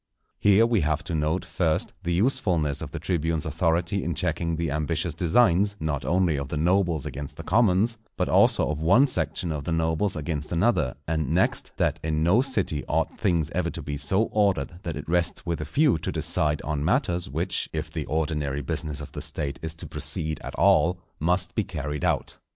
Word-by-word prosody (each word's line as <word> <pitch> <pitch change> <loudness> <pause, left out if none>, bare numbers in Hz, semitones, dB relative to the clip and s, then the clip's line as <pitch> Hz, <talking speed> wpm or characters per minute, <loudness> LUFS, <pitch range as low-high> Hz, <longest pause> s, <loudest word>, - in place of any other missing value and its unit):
Here 105 +2 +5
we 115 -4 +2
have 75 0 0
to 90 - -5
note, 80 +3 0
first, 80 -4 -1
the 85 -2 -2
usefulness 90 - +1
of - - -5
the - - -6
tribunes' 80 -3 -1
authority 85 +4 0
in 85 -1 -2
checking 85 -1 -1
the 80 -2 -2
ambitious 75 0 -1
designs, 100 +1 +3
not 75 -3 -2
only 90 -3 +2
of 70 -1 -3
the 75 - -3
nobles 85 -1 +1
against 70 0 -6
the 85 - -7
commons, 110 +3 +2 0.2
but - - 0
also - - +4
of 75 - -3
one 95 - +5
section 80 - -1
of 75 -2 -3
the 85 - -3
nobles 80 +4 +1
against 75 -1 -4
another; 85 - +1
and 80 -3 -1
next, - - +1
that - - +1
in 80 0 0
no 95 +9 +4
city 100 - -1
ought - - -1
things 85 -4 +1
ever - - 0
to - - -6
be 75 - -4
so 75 +9 +2
ordered 95 -6 +1
that 85 -5 -4
it 75 - -7
rests 85 +1 0
with 85 -2 -2
a - - -3
few 145 - +2
to - - -3
decide 75 -1 0
on 75 -1 -2
matters, 90 - 0
which, 85 +6 -2
if - - -4
the - - -4
ordinary 75 -3 -1
business 75 +3 -3
of 75 - -8
the - - -6
State 70 -2 -4
is 80 0 -5
to 80 - -9
proceed 80 0 -3
at - - -6
all, 85 +4 +4 0.2
must 90 +4 0
be - - +1
carried 75 +1 -4
out. - - -1
80 Hz, 200 wpm, -26 LUFS, 75-90 Hz, 0.2 s, Here